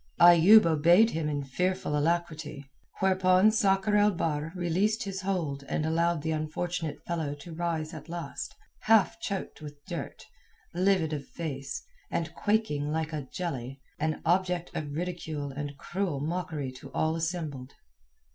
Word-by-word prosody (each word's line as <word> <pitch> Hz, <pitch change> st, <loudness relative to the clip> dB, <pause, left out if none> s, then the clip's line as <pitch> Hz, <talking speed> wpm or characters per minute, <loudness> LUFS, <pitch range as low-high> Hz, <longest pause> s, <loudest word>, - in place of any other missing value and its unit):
Ayoub 175 Hz, +5 st, +8 dB
obeyed 170 Hz, +8 st, +5 dB
him 160 Hz, -2 st, -1 dB
in 145 Hz, -1 st, -2 dB
fearful 180 Hz, +3 st, -1 dB
alacrity, 155 Hz, -2 st, -1 dB, 0.4 s
whereupon 185 Hz, +1 st, +5 dB
Sakr 200 Hz, -2 st, +2 dB
el 205 Hz, 0 st, +5 dB
Bahr 160 Hz, -4 st, -1 dB
released 190 Hz, +6 st, +1 dB
his 195 Hz, -2 st, -4 dB
hold 165 Hz, -8 st, -2 dB
and 155 Hz, -, 0 dB
allowed 165 Hz, 0 st, +1 dB
the 160 Hz, -, -1 dB
unfortunate 160 Hz, +1 st, -3 dB
fellow 160 Hz, -4 st, -2 dB
to 165 Hz, +4 st, -10 dB
rise 165 Hz, -1 st, -2 dB
at 160 Hz, +1 st, -9 dB
last, 170 Hz, -1 st, -5 dB, 0.2 s
half 225 Hz, 0 st, +4 dB
choked 195 Hz, -6 st, -4 dB
with 145 Hz, -1 st, -10 dB
dirt, -, -, -6 dB, 0.5 s
livid 180 Hz, -3 st, +2 dB
of 140 Hz, -2 st, -4 dB
face, 140 Hz, -5 st, -5 dB, 0.3 s
and 165 Hz, -1 st, -2 dB
quaking 175 Hz, -9 st, 0 dB
like 160 Hz, 0 st, -2 dB
a 145 Hz, -4 st, -4 dB
jelly, 135 Hz, -7 st, -4 dB, 0.2 s
an 155 Hz, 0 st, -1 dB
object 180 Hz, 0 st, +1 dB
of 150 Hz, -2 st, -3 dB
ridicule 160 Hz, -4 st, -4 dB
and 145 Hz, 0 st, -5 dB
cruel 175 Hz, -2 st, -2 dB
mockery 155 Hz, -3 st, -3 dB
to 130 Hz, -, -12 dB
all 160 Hz, 0 st, +1 dB
assembled. 160 Hz, -6 st, -4 dB
165 Hz, 145 wpm, -29 LUFS, 150-185 Hz, 0.5 s, Ayoub